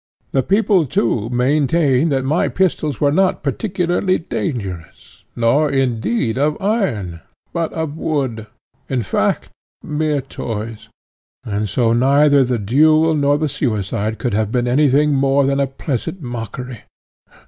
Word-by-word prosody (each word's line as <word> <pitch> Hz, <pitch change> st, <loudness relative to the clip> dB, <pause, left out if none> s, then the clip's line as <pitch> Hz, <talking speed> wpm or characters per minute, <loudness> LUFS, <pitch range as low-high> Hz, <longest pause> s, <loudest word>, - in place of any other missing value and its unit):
The 135 Hz, -, +2 dB
people, 195 Hz, -, +2 dB
too, 115 Hz, -3 st, 0 dB
maintain 140 Hz, +3 st, +2 dB
that 135 Hz, -2 st, 0 dB
my 150 Hz, +5 st, +1 dB
pistols 155 Hz, -7 st, 0 dB
were 145 Hz, -1 st, +3 dB
not 190 Hz, +4 st, +1 dB
particularly 180 Hz, +3 st, 0 dB
dangerous, 100 Hz, -, -6 dB
nor, 135 Hz, +6 st, +2 dB
indeed, 120 Hz, -2 st, 0 dB
of 150 Hz, +2 st, 0 dB
iron, 120 Hz, -, -1 dB, 0.3 s
but 165 Hz, -1 st, -1 dB
of 160 Hz, -2 st, -4 dB
wood 130 Hz, -8 st, -2 dB, 0.4 s
in 125 Hz, -3 st, -1 dB
fact -, -, -1 dB, 0.3 s
mere 150 Hz, -1 st, -1 dB
toys 115 Hz, -2 st, -6 dB, 0.5 s
and 105 Hz, -3 st, -2 dB
so 115 Hz, +2 st, +1 dB
neither 140 Hz, +3 st, +4 dB
the 125 Hz, -1 st, 0 dB
duel 155 Hz, +9 st, +3 dB
nor 145 Hz, -1 st, +2 dB
the 155 Hz, +1 st, 0 dB
suicide 110 Hz, -4 st, -2 dB
could 125 Hz, -, -2 dB
have 105 Hz, 0 st, 0 dB
been 125 Hz, 0 st, 0 dB
any 140 Hz, +4 st, +3 dB
thing 145 Hz, +3 st, +3 dB
more 135 Hz, 0 st, +2 dB
than 140 Hz, 0 st, +1 dB
a 140 Hz, -, +1 dB
pleasant 135 Hz, +5 st, -4 dB
mockery. 120 Hz, -, -6 dB
135 Hz, 135 wpm, -18 LUFS, 115-155 Hz, 0.5 s, neither